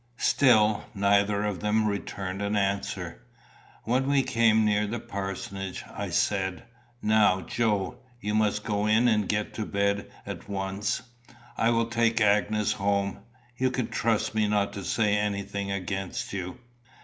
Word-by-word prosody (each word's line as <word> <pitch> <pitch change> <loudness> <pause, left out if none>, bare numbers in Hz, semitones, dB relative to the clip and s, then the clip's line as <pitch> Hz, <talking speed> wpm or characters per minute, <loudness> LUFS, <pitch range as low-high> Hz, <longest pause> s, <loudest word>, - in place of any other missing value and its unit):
Still 110 -7 +4
neither 100 +1 +2
of 100 -4 -2
them 105 +3 +1
returned 100 -2 -3
an 100 +1 -1
answer. 100 0 -2 0.6
When 130 +3 +1
we 140 -1 +3
came 115 -2 +3
near 105 0 +2
the 115 +3 -3
parsonage, 95 -1 -5
I - - -4
said, 95 -2 0 0.4
"Now, 105 -3 +4
Joe, 105 +3 -1 0.2
you 105 -2 -3
must 105 -1 +1
go 105 -1 0
in 110 +3 +4
and 105 -4 +2
get 105 0 -1
to 110 - -3
bed 100 0 0 0.2
at - - -7
once. 100 +4 -2 0.5
I 115 - +2
will 115 0 +2
take 115 0 +1
Agnes 105 0 +2
home. 100 0 0 0.4
You 130 +1 +2
can 125 -1 -2
trust 115 -3 0
me 110 -1 +2
not 100 -1 +1
to 100 -2 -6
say 105 +2 +1
anything 100 -1 -2
against 95 0 -3
you?" 90 -2 -4
105 Hz, 150 wpm, -27 LUFS, 100-110 Hz, 0.6 s, Still